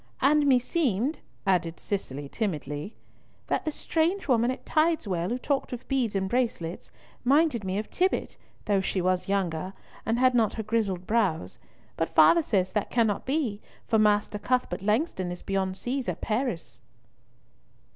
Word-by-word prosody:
"And 290 +2 +4
meseemed," 260 - +1 0.3
added 175 -4 +1
Cicely 145 -8 -4
timidly, 150 - -3 0.5
"that - - -1
the 310 - 0
strange 335 +5 0
woman 240 -2 +3
at 255 - -4
Tideswell 230 - +1
who 245 - -1
talked 275 0 -1
of 245 +1 -7
beads 255 -6 0
and 190 -1 0
bracelets 190 -8 -2 0.3
minded 275 -3 +3
me 190 0 -2
of 210 - -3
Tibbott, 370 +1 0 0.3
though 200 -2 +2
she 190 - -1
was 185 0 0
younger, 185 -2 -1 0.3
and 225 +1 0
had 255 +1 +4
not 230 -3 +3
her 220 - -4
grizzled 205 -5 -1
brows; 200 -7 0 0.4
but - - 0
father 335 - +6
says 190 - 0
that 210 0 -1
cannot 225 -3 +1
be, 260 -8 -1 0.3
for 220 -2 +3
Master 210 0 +2
Cuthbert 245 -6 0
Langston 210 - 0
is 175 - -7
beyond 190 -1 -1
seas 255 +3 -2
at - - -3
Paris." 215 - -2
215 Hz, 155 wpm, -27 LUFS, 190-255 Hz, 0.5 s, father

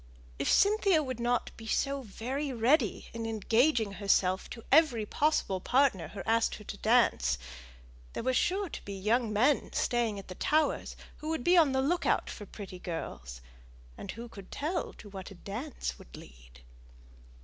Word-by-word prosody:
If - - 0
Cynthia 400 -6 +4
would 255 -3 -5
not 240 +1 0
be 225 - -10
so 275 +4 0
very 260 +6 -4
ready 250 +6 +1
in 230 0 -4
engaging 225 +2 +2
herself 195 -2 +1
to 230 - -9
every 275 -7 +5
possible 285 -7 +1
partner 245 - +2
who 195 - -7
asked 225 0 +2
her 210 - -11
to 205 - -7
dance, 215 - +3 0.8
there - - -4
were 260 +1 +1
sure 380 +9 +1
to - - -7
be 200 - -6
young 220 +4 +1
men 250 +7 +2
staying 235 -4 0
at 195 - -9
the 185 - -7
Towers 310 +11 0 0.2
who 305 - -6
would 320 -6 -2
be 355 - +5
on 320 -5 +6
the 265 0 +1
look 345 +6 0
out - - +1
for 205 - -9
pretty 190 -3 -9
girls: 60 - -6 0.5
and - - -9
who 235 +2 -8
could 200 -4 -12
tell 330 +4 -2
to 210 - -13
what 195 -2 -8
a 195 - -11
dance 205 - -5
might - - -13
lead? - - -15
230 Hz, 175 wpm, -30 LUFS, 195-280 Hz, 0.8 s, on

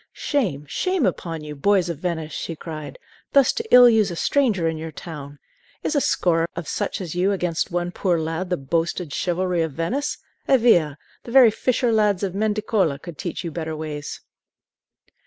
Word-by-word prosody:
"Shame, 190 - -1
shame 365 - 0
upon 165 -3 -3
you, 150 0 -7
boys 185 +4 +2
of 170 -4 -4
Venice," 160 -3 -3
she 165 - -4
cried, 155 -1 -8 0.4
"thus 275 -2 +5
to 460 - -3
ill 250 0 +9
use 220 -4 +4
a 175 - -5
stranger 215 -6 +1
in 160 - -1
your 160 0 -6
town! 145 -2 -9 0.5
Is - - -1
a 285 - +3
score 165 -6 +1
of 170 -2 -5
such - - -2
as 170 -4 -5
you 180 +3 +1
against 180 -4 -1
one 175 0 -2
poor 180 -2 0
lad 165 +3 -3
the 180 - 0
boasted 165 +2 -2
chivalry 180 -1 0
of 160 -3 -2
Venice? 245 - -2 0.3
Eh 270 - +6
via! 175 - +3 0.2
the 235 - -10
very 250 -3 +7
fisher 245 +2 0
lads 210 -3 +2
of 190 -3 -1
Mendicoli 210 -6 0
could 165 -2 -10
teach 175 - -4
you 170 - -4
better 160 0 -4
ways!" 150 -2 -6
175 Hz, 185 wpm, -23 LUFS, 160-215 Hz, 0.5 s, ill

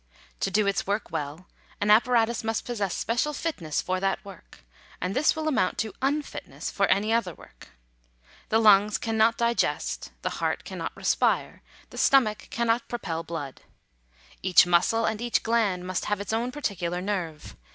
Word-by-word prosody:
To - - 0
do 205 +2 +2
its 200 -1 0
work 205 +2 -2
well, 150 +5 -4 0.3
an 205 +1 +2
appa 225 +4 +5
ratus 235 -1 +2
must 225 0 -2
possess 205 -6 -2
special 240 +6 0
fitness 195 - -2
for 185 0 -1
that 195 +1 -1
work; 195 - -13 0.4
and 185 +2 -3
this 295 +3 +3
will 315 0 -3
amount 260 -11 +1
to 220 -3 -2
unfitness 290 +2 -3
for - - +1
any 210 +4 +2
other 190 -8 0
work. - - -16 0.8
The 220 - +3
lungs 210 -1 +5
cannot 225 0 +2
di 235 0 +2
gest, - - -1
the - - -1
heart - - -1
cannot - - -6
respire, - - +1 0.3
the - - -7
stomach 230 -6 +3
cannot 235 0 0
propel 170 -9 -3
blood. 160 -5 -6 0.8
Each 185 -1 +6
muscle 180 +6 +3
and 220 0 -1
each 240 -1 0
gland 215 -6 +1
must 185 0 -2
have 210 -1 -1
its 200 +2 -4
own 235 +3 -1
particular 180 - -3
nerve. 180 -6 -4
210 Hz, 170 wpm, -26 LUFS, 185-235 Hz, 0.8 s, Each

